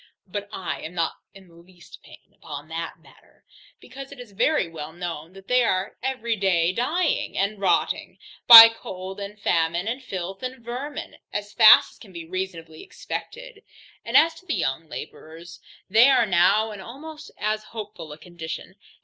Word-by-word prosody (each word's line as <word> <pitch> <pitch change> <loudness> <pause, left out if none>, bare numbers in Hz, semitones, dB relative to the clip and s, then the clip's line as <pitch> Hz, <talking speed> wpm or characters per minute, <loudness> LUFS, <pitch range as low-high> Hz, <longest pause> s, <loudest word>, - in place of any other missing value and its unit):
But 205 +1 -6
I 190 - -5
am 165 +3 -8
not 165 -2 -1 0.2
in 195 -1 -15
the 170 - -21
least 170 +1 -17
pain - - -18
upon 145 0 -10
that 165 0 -5
matter, - - -24 0.3
because 270 +2 -11
it 280 - -12
is 245 -4 -11
very 230 - +1
well 160 -2 -8
known, 170 -1 -7
that 195 0 -15
they 250 0 +3
are 190 -3 -1
every 240 -3 -2
day 180 -4 +1
dying, 310 - -1
and 200 +1 -1
rotting, 180 -4 0 0.3
by 230 -1 +13
cold 190 -3 -9
and 200 +1 -8
famine, 170 0 0
and 250 +4 -3
filth, 190 -5 -6
and 255 -2 -7
vermin, 260 +5 -6
as 205 0 -5
fast 220 -2 +7
as - - -22
can 205 - -15
be 170 -2 -9
reasonably 170 -3 -6
expected. - - -8 0.4
And - - +2
as 330 +1 +5
to 370 - -24
the 330 - -1
young 150 +4 -3
labourers, 165 +2 -10 0.3
they 225 +7 +6
are 255 -4 +4
now 200 +4 +3
in 205 -2 -9
almost 300 +8 -10
as 215 0 -2
hopeful 210 -8 -9
a 150 - -9
condition. 175 +2 -9
195 Hz, 175 wpm, -24 LUFS, 170-235 Hz, 0.4 s, by